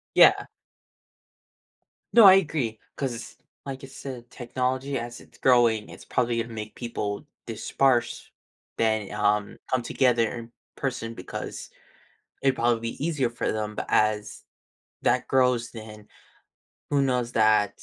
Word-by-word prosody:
Yeah. - - +6 1.7
No, 230 - +9
I 190 -1 +11
agree. 150 - 0 0.2
'Cause, 125 -4 -4 0.3
like 135 0 -6
you 135 - -9
said, 130 -3 -9
technology, 130 +2 -2
as 120 0 -7
it's - - -19
growing, 120 -4 +3
it's - - -12
probably 120 -1 0
gonna 115 0 -5
make 110 -1 -6
people 105 0 -4 0.2
disperse 120 +2 0 0.5
than, 110 -3 +1
um, 105 0 0
come 130 -1 +1
together 120 -2 +2
in 115 0 -10 0.2
person 120 -4 -3
because 90 - -7 0.7
it'd 135 -1 +3
probably 120 -1 +2
be 145 - -5
easier 150 -7 0
for 120 - -2
them. 105 -1 -3
But - - -4
as 105 0 +1 0.6
that - - +1
grows, 125 -2 +2
then 110 -2 -10 0.8
who 140 -1 +3
knows 125 -3 0
that 110 -2 +3
120 Hz, 130 wpm, -26 LUFS, 110-130 Hz, 1.7 s, I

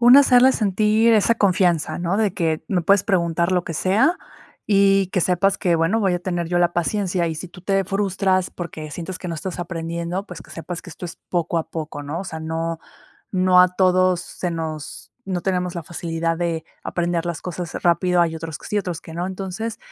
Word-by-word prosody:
Uno, 245 +4 +9
hacerle 260 -1 +6
sentir 215 +2 +3
esa 220 +2 +4
confianza, 175 -6 +2
¿no? 175 +3 0
De 215 -3 +1
que 165 -5 -1
me 180 -3 +1
puedes 200 +3 +4
preguntar 170 -3 +1
lo 180 -1 +1
que 165 - -5
sea 210 - +2 0.5
y 195 -2 +4
que 185 - 0
sepas 185 +3 +2
que, 175 -2 +2
bueno, 165 +7 +2
voy 190 -4 +2
a 175 - 0
tener 175 -2 -2
yo 175 - +1
la 175 0 +3
paciencia. 180 0 0
Y 160 - -2
si 175 +3 -6
tú 180 0 -14
te 195 0 +1
frustras 195 -1 0
porque 155 -3 -7
sientes 180 +2 -6
que - - -7
no 165 - -3
estás 180 +3 -5
aprendiendo, 170 +2 -3
pues, 180 - -9
que - - -18
sepas 170 +1 -6
que 175 - -11
esto 160 - -9
es 170 - -7
poco 170 -1 0
a 160 - -4
poco, 155 -2 -5
¿no? 145 +4 -4
O 195 - -6
sea, 160 -3 -6
no 165 +1 -3 0.5
no 185 -1 +5
a 180 - +6
todos 185 -1 +3
se 180 - -4
nos 160 -3 -6
no 180 -2 -2
tenemos 180 -2 -1
la 170 - -4
facilidad 165 0 -2
de 165 -2 -1 0.2
aprender 175 -1 -1
las 170 -2 -4
cosas 175 -2 -5
rápido, 175 0 +3
hay 165 -1 0
otros 160 -1 -6
que - - -12
sí, 210 - 0
otros 175 -4 -3
que 160 - -10
no. 175 +2 -2
Entonces, 190 +4 -5
180 Hz, 215 wpm, -22 LUFS, 165-195 Hz, 0.5 s, Uno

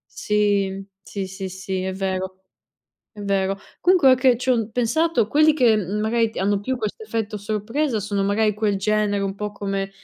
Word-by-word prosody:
Sì, 200 -2 0 0.2
sì, 195 +1 -5
sì, 190 0 -6
sì, 190 0 -4
è 190 0 -2
vero. 190 -1 -3 0.8
È 210 - -11
vero. 195 -1 0 0.2
Comunque 360 -5 +5
ora 255 - +7
che 255 -2 +4
ci 260 - -5
ho 250 - +4
n 225 -1 -2
pensato, 250 +3 +1
quelli 305 +4 +5
che, 245 -7 +4
uhm, 205 0 -1
magari 225 +1 +1
hanno 200 +1 +1
più 260 +5 -2
questo 220 - -4
effetto 225 - -3
sorpresa 220 +5 -1
sono 200 0 -1
magari 210 +1 +1
quel 210 -2 0
genere, 210 0 +1
un 195 0 -2
po' 210 +1 -4
come 195 -1 -3
210 Hz, 185 wpm, -22 LUFS, 195-230 Hz, 0.8 s, ora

